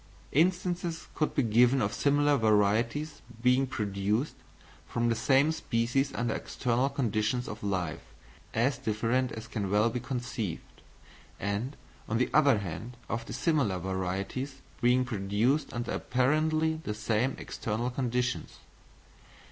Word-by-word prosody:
Instances 175 +1 +1
could 155 - -1
be 140 - +3
given 120 +4 +4
of 105 -4 0
similar 145 0 +3
varieties 110 +6 +2 0.2
being 125 +3 +3
produced 105 +2 -1 0.5
from 120 0 0
the 115 - +2
same 135 +6 +4
species 135 -1 0
under 115 -1 0
external 125 +2 0
conditions 120 -2 0
of 105 - -6
life 90 -5 -2 0.5
as 120 +3 +1
different 115 +4 0
as 110 0 -6
can 100 -4 -3
well 105 +3 +3
be 125 - -2
conceived; 120 -7 -5 0.6
and, 100 +8 -2 0.3
on 115 - +1
the 125 - +1
other 145 -6 +5
hand, 100 +6 -6
of 115 0 -3
dissimilar 145 - +1
varieties 95 +9 -3 0.2
being 125 +1 +4
produced 110 +6 0
under 120 0 -3
apparently 155 +4 +1
the 105 - -3
same 110 +4 0
external 115 +3 -3
conditions. 125 -1 -1
120 Hz, 125 wpm, -30 LUFS, 105-135 Hz, 0.6 s, other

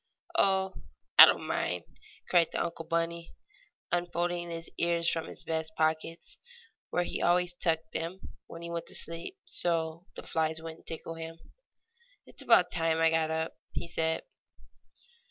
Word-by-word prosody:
"Oh, 190 -1 +3 0.5
I - - +16
don't - - +1
mind!" 90 -1 -1 0.4
cried 170 -2 +4
the 170 - -1 0.2
bunny 170 0 -1 0.6
uncle, 175 0 +1 0.2
unfolding 175 0 -2
his 165 0 -5
ears 170 -1 +2
from 165 -1 0
his - - -8
vest 160 0 -2
pockets, 160 +1 -1 0.5
where 175 - +1
he 175 - -3
always 180 0 +3
tucked 160 -2 0
them 170 +3 -3 0.3
when 165 0 -9
he 170 - -5
went 170 0 -4
to - - -7
sleep, 170 - -3
so 170 - -1
the - - -6
flies 160 0 -1
would 160 0 -7
not - - -22
tickle 165 0 -5
him. 165 0 -7 0.9
"It's - - -4
about - - +5
time 165 -1 +1
I 165 0 +5
got 160 -1 +2
up," 160 0 -1 0.2
he - - -3
said. 160 -1 0
165 Hz, 155 wpm, -30 LUFS, 160-175 Hz, 0.9 s, I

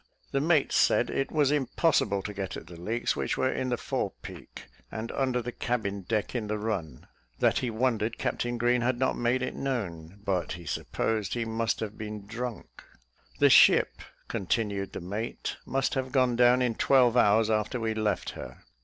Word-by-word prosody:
The 135 - +1
mate 155 -2 +3
said - - +3
it 135 - -1
was 145 -3 +3
impossible 140 - +1
to 105 - -5
get 95 -2 -4
at - - -9
the 85 - -11
leaks, 110 +8 -1
which - - -2
were 130 - +1
in 130 - -2
the 120 - 0
fore - - -2
peak, - - -10 0.3
and 110 +1 -5
under 130 -3 0
the 120 - -4
cabin 110 -6 -2
deck 105 +2 -2
in 115 -4 -2
the 105 0 -1
run; 95 - -4 0.3
that - - +3
he 130 -3 -2
wondered 115 -1 0
Captain 120 0 -2
Green 120 +1 +2
had 120 +1 +1
not 130 +1 +1
made 120 +2 +1
it 130 - -2
known, 100 -9 -4
but 90 -5 -1
he 85 +1 -9
supposed 110 +6 -2
he 120 -1 -1
must 115 0 -1
have 110 -1 -5
been 105 -1 -6
drunk: 120 +1 -6 0.5
"the - - +5
ship," - - +6 0.3
continued 100 0 -2
the - - -5
mate, 105 +6 -4
"must 135 -1 0
have 130 -1 -2
gone 125 -2 +3
down 125 +1 +5
in 120 -2 +1
twelve 125 0 +4
hours 110 -1 +4
after 110 +3 0
we 110 -1 -1
left 110 -3 -1
her." - - -10
115 Hz, 190 wpm, -28 LUFS, 105-125 Hz, 0.5 s, ship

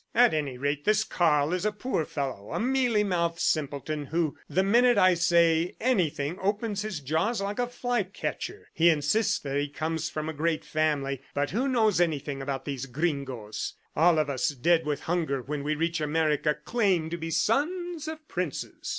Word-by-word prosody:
"At 245 -3 +6
any 145 -5 -2
rate, 145 +2 -1
this 215 +1 +3
Karl 155 -6 +2
is 180 - -1
a 215 - +1
poor 210 -6 -2
fellow, 135 -10 -4
a - - -1
mealy 245 -3 +2
mouthed 170 -4 0
simpleton 150 -1 -1
who 160 -1 0
the 190 - +2
minute 240 +5 +4
I 185 0 +6
say 170 0 +3
anything 170 - 0
opens 205 +1 -1
his 210 -8 -4
jaws 160 - 0
like 200 +3 -3
a 245 - +1
fly 245 -1 -1
catcher. 200 - -5
He 170 +1 +5
insists 160 +8 +2
that 140 -1 -3
he 145 0 -1
comes 160 +2 -2
of 155 0 -2
a 160 - -3
great 160 +1 -1
family, 145 -4 0
but 145 0 0
who 245 +9 0
knows 220 -8 +3
anything 145 -4 -1
about 135 -1 -4
these 135 -2 -4
gringoes?... 130 -7 -3 0.2
All 165 +1 +5
of 155 -2 +2
us, 135 -3 0
dead 160 +4 +2
with 145 -1 -1
hunger 160 -6 -1
when 145 +2 -4
we 155 +1 0
reach 165 +1 -1
America, 150 -1 +1
claim 180 -2 0
to 170 - -2
be 165 0 -5
sons 310 - 0
of 315 -1 -7
princes." 180 -6 -4
165 Hz, 185 wpm, -27 LUFS, 145-205 Hz, 0.2 s, At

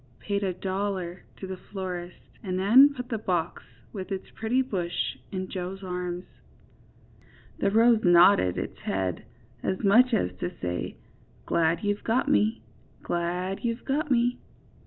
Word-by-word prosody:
paid 200 0 -2
a 190 - +1
dollar 185 -1 -3 0.2
to - - -5
the 190 -1 -6
florist 180 -3 -5 0.2
and 185 +4 -3
then 245 +10 +7
put 250 -1 -5
the 225 -3 -2
box, 175 -4 -1 0.3
with 195 -1 -6
its 190 -1 -5
pretty 225 +3 0
bush 185 -9 -1 0.2
in 185 -1 -3
Joe's 190 +1 -5
arms. 180 -1 -4 1.3
The - - +2
rose 225 +2 +5
nodded 175 - +6
its - - -5
head, 95 -2 -2 0.4
as 190 - -2
much 235 +6 +6
as 90 - 0
to 85 - -2
say: 90 -1 -3 0.5
^^Glad 165 +1 +1
you've 205 0 -1
got 230 +3 +1
me! 110 +2 +2 0.4
glad 180 +2 -2
you've 230 0 -2
got 290 +2 -1
me! 245 -1 +2
190 Hz, 145 wpm, -27 LUFS, 175-220 Hz, 1.3 s, then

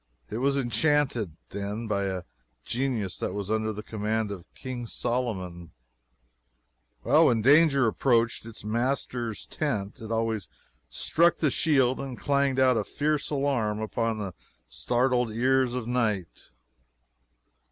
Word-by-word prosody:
It 110 - -2
was 140 +2 +2
enchanted, 125 - +1
then, 100 +3 -4
by 100 -2 0
a 95 -2 -3 0.4
genius 120 -7 -2
that - - -3
was 100 0 -3
under 110 0 0
the 105 0 -6
command 110 0 -2
of 95 -3 -9
King 125 -2 -6
Solomon. 95 -10 -3 1.3
When 115 -3 +4
danger 140 0 +6
approached 115 0 +2
its 115 - -9
master's 120 0 -2
tent 110 -11 -3
it 110 0 -7
always 115 -3 -1 0.4
struck 170 - +3
the 150 -4 +2
shield 130 -5 +3
and 135 -3 -5
clanged 140 -2 +1
out 130 -2 +4
a 105 - +1
fierce 150 +7 -1
alarm 135 -7 0
upon 115 +1 -1
the 100 -4 -4 0.3
startled 125 -1 +1
ear 130 +4 +3
of 125 -2 -2
night. 110 -8 -1
115 Hz, 130 wpm, -27 LUFS, 105-130 Hz, 1.3 s, danger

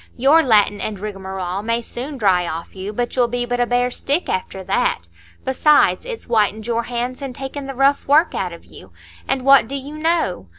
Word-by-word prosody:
Your 280 +6 +5
Latin 210 -6 +3
and 210 -3 -4
rigmarole 190 -2 -5
may 230 +2 -1
soon 270 +5 -6
dry 185 -6 +2
off 165 +3 -6
you, 190 +2 -5
but 240 +3 -3
you'll 245 -2 +3
be 245 +1 -2
but 245 0 -2
a 245 - +2
bare 245 +1 +1
stick 285 +7 -1
after 190 +1 -3
that. 180 - 0 0.4
Besides, 295 - +3
it's 485 -2 -6
whitened 215 -2 +1
your 235 0 -1
hands 245 +2 -4
and 270 -3 -6
taken 270 +1 -6
the 270 - -6
rough 275 +2 +2
work 310 +4 +4
out 180 -2 -2
of 170 - -12
you. 95 - -14 0.4
And 265 -1 -1
what 275 -4 +6
do 275 - -5
you 280 +2 -6
know? 310 - 0
245 Hz, 205 wpm, -20 LUFS, 200-275 Hz, 0.4 s, what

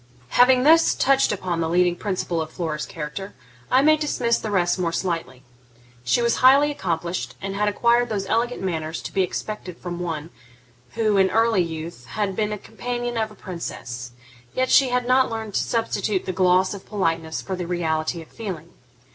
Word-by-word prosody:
Having 250 +1 +5
thus 325 +3 +5
touched 275 0 +3
upon 185 -4 -2
the 160 - 0
leading 175 0 +3
principle 180 -3 -2
of 155 - -4
Flora's 155 -3 -3
character, 165 +6 -6 0.3
I 260 +2 +4
may 310 +1 +5
dismiss 250 -6 0
the 220 - -4
rest 180 -2 +1
more 170 -2 0
slightly. 165 -8 -3 0.6
She 125 - +2
was 235 - +2
highly 275 +3 +6
accomplished, 170 - -3
and 195 0 -4
had 210 +1 +1
acquired 235 +3 +2
those 200 -3 -2
elegant 235 +2 -1
manners 160 -3 -2
to - - -7
be 195 - +2
expected 185 -1 -4
from 175 -1 -6
one 165 -2 -4 0.6
who, 215 -3 +1
in 190 -1 +4
early 225 -2 +3
youth, 160 -5 -6
had 205 -3 -2
been 210 +1 0
the 210 - -3
companion 240 +3 -4
of 220 -1 0
a 215 - -15
princess; 125 - -7 0.4
yet 255 0 +1
she 270 -2 +6
had 250 0 0
not 260 +1 +4
learned 220 -2 -5
to - - +1
substitute 210 -4 -1
the 185 - -3
gloss 185 +1 +3
of 200 - -8
politeness 165 -6 -2
for 190 - -3
the 180 -2 -5
reality 165 -1 -1
of - - -19
feeling. 180 -7 -7
190 Hz, 185 wpm, -23 LUFS, 170-230 Hz, 0.6 s, highly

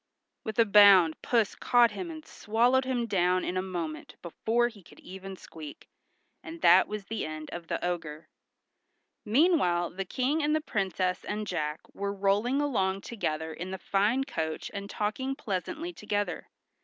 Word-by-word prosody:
with 220 -2 -5
a 230 - +6
bound 200 -6 +7
Puss 230 -4 +1
caught 240 -2 +4
him 340 - -5
and 315 -1 -8
swallowed 245 +4 +1
him 250 -2 -1
down 185 -3 +1
in 180 - -2
a 185 - +1
moment 170 -5 -5
before 225 +7 0
he 225 -4 -11
could - - -18
even 190 +1 -9
squeak, 155 -5 -11 0.5
and 330 +1 -9
that 190 - +6
was 210 -2 -5
the 225 +2 -3
end 155 0 -6
of 175 -1 -7
the - - -2
ogre. 165 -3 -4 1.0
Meanwhile 215 - +3
the 195 +2 -4
King 265 - 0
and 300 +1 +2
the - - +2
Princess 190 - -1
and 210 0 -3
Jack 150 -5 -3
were 200 0 -3
rolling 205 +7 +1
along 195 -9 0
together 160 -9 -3
in 180 +3 -6
the 190 - -4
fine 205 +8 +1
coach 160 - -4
and 200 0 -6
talking 260 +6 -2
pleasantly 310 - -4
together. 205 - -3
200 Hz, 165 wpm, -29 LUFS, 180-240 Hz, 1.0 s, bound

